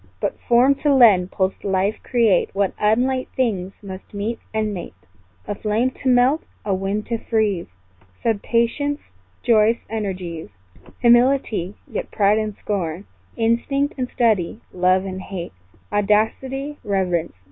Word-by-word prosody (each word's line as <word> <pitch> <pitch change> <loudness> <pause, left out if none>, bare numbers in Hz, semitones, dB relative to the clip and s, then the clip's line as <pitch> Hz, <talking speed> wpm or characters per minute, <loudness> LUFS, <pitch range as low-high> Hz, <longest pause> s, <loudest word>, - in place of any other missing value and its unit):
But - - -2
form 245 +3 +4
to 295 - +3
lend, 215 -9 +6
pulsed 190 0 -1
life 195 +2 +1
create, 230 -7 +2
What 200 -1 +1
unlike 250 +5 +1
things 195 -7 -1
must 190 +1 -9
meet 215 +3 -3
and 215 -1 -1
mate: 180 - -7 0.5
A - - -1
flame 220 +5 0
to 260 - +1
melt 255 +5 +4 0.2
a 200 - +1
wind 195 +3 -2
to 230 -2 -2
freeze; 215 -7 0 0.6
Sad 225 -3 +1
patience 285 +5 0 0.4
joyous 225 -1 +4
energies; 185 - -4 0.5
Humility 240 -6 +3
yet - - -4
pride 205 +1 +3
and 215 -1 -3
scorn; 185 -2 -3 0.3
Instinct 240 +5 +1
and 255 -2 -3
study; 215 -5 +1
love 185 +1 +2
and 190 -1 -5
hate; 185 - -6 0.4
Audacity 255 +8 0
reverence. 180 - -1
215 Hz, 135 wpm, -21 LUFS, 190-240 Hz, 0.6 s, lend